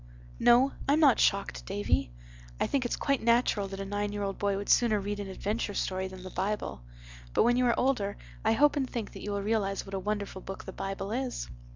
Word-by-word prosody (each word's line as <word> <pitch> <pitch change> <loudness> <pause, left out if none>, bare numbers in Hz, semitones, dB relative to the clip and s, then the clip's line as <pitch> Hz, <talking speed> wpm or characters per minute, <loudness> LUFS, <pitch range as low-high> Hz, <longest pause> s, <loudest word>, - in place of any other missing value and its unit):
"No, 250 +3 +6 0.2
I'm 290 +2 +4
not 285 -6 +6
shocked, 200 0 +1
Davy. 200 - 0 0.5
I - - +2
think 270 -3 0
it's 240 - 0
quite 275 -2 0
natural 235 -3 +2
that 195 0 -7
a 195 - -3
nine 205 +1 -2
year 205 0 -3
old 195 -1 -3
boy 200 -1 +1
would 200 - -5
sooner 220 -4 +4
read 205 +1 -3
an 200 - -4
adventure 205 +2 -2
story 190 0 -1
than 185 -1 -10
the 185 - -8
Bible. 195 - -2 0.5
But - - +5
when 240 +1 +4
you 250 0 +3
are 235 - +2
older 230 -6 +1 0.3
I 220 - +3
hope 295 +6 +4
and 270 -3 -1
think 230 -4 -4
that - - -9
you 210 - -5
will 200 0 -2
realize 200 -2 0
what 195 - -10
a 195 - -1
wonderful 200 -1 -3
book 195 - -7
the 190 - -7
Bible 195 +1 -4
is." 250 - -3
205 Hz, 230 wpm, -29 LUFS, 195-240 Hz, 0.5 s, No